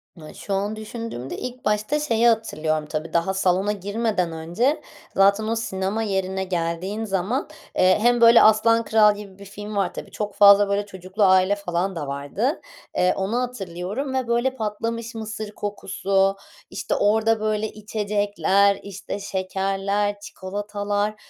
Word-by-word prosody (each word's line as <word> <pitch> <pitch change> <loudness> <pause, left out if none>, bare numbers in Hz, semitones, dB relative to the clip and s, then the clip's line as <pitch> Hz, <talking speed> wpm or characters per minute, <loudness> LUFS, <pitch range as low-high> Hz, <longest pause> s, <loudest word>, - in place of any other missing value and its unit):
Na 155 -2 -11
şu 200 - -5
an 205 +2 -1
düşündüğümde 215 - -6
ilk 250 0 -7
başta 210 +8 +1
şeyi 235 -6 +2
hatırlıyorum 155 -9 0
tabii: 155 +1 -4
Daha 170 +3 +1
salona 190 +1 +1
girmeden 205 -3 -1
önce 175 - -1 0.3
zaten 200 +2 +4
o 225 - 0
sinema 215 -1 -2
yerine 190 -2 -1
geldiğin 185 +4 -2
zaman, 200 - -1 0.3
eee, 185 0 +5
hem 240 0 +3
böyle 230 0 +8
“Aslan 230 +2 +5
Kral” 210 -2 +5
gibi 200 -2 -11
bir 200 - -11
film 205 +1 -8
var. 195 -3 0
Tabii, - - -8
çok 210 -1 -4
fazla 200 0 +7
böyle 200 +1 0
çocuklu 190 +1 -3
aile 190 +1 +5
falan 185 -1 -2
da 150 -4 -4
vardı. 145 - -2 0.4
Eee, 180 0 +3
onu 210 +6 0
hatırlıyorum 215 +2 -4
ve, 260 -2 -1
böyle, 240 +3 +1
patlamış 230 +1 -4
mısır 215 -1 -5
kokusu, 195 -1 0 0.3
işte, - - -3
orada, 220 +2 +2
böyle, 215 0 0
içecekler, 205 -1 +1
işte, 200 0 -6
şekerler, 195 +2 -1
çikolatalar. 205 +1 -3
205 Hz, 145 wpm, -23 LUFS, 190-220 Hz, 0.4 s, böyle